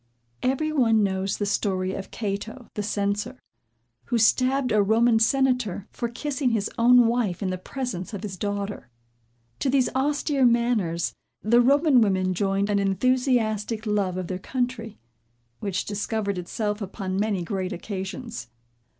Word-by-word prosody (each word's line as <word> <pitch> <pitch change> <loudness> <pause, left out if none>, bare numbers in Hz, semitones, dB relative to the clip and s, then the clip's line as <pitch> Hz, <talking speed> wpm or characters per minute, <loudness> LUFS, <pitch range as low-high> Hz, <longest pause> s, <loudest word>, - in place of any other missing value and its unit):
Every 270 +5 0
one 225 -7 +3
knows 190 0 -1
the 205 - -1
story 190 -2 0
of 195 - -6
Cato 220 +3 -5
the 210 - -3
censor, 205 +4 -2 0.7
who 240 - 0
stabbed 255 +3 +3
a 210 - +4
Roman 225 +3 +4
Senator 250 -5 +1
for 235 - -3
kissing 270 +2 -1
his 220 -3 -1
own 245 +1 +6
wife 225 -6 0
in 185 - -1
the 185 - -2
presence 240 -4 -5
of 205 -1 -6
his 200 -3 -4
daughter. 200 - -4 0.7
To 275 - 0
these 260 -1 +3
austere 285 +1 +1
manners, 235 -9 +2 0.3
the 235 +3 +5
Roman 280 +1 +5
women 190 -3 +2
joined 195 +2 0
an 200 - +2
enthusiastic 220 +1 +1
love 200 -4 0
of 185 - -3
their 185 +1 -4
country, 245 -1 -3 0.6
which 195 -2 -2
discovered 205 -1 -2
itself 210 +4 -3
upon 190 -1 -3
many 205 -4 0
great 185 +1 -3
occasions. 195 - -6
215 Hz, 145 wpm, -25 LUFS, 195-245 Hz, 0.7 s, own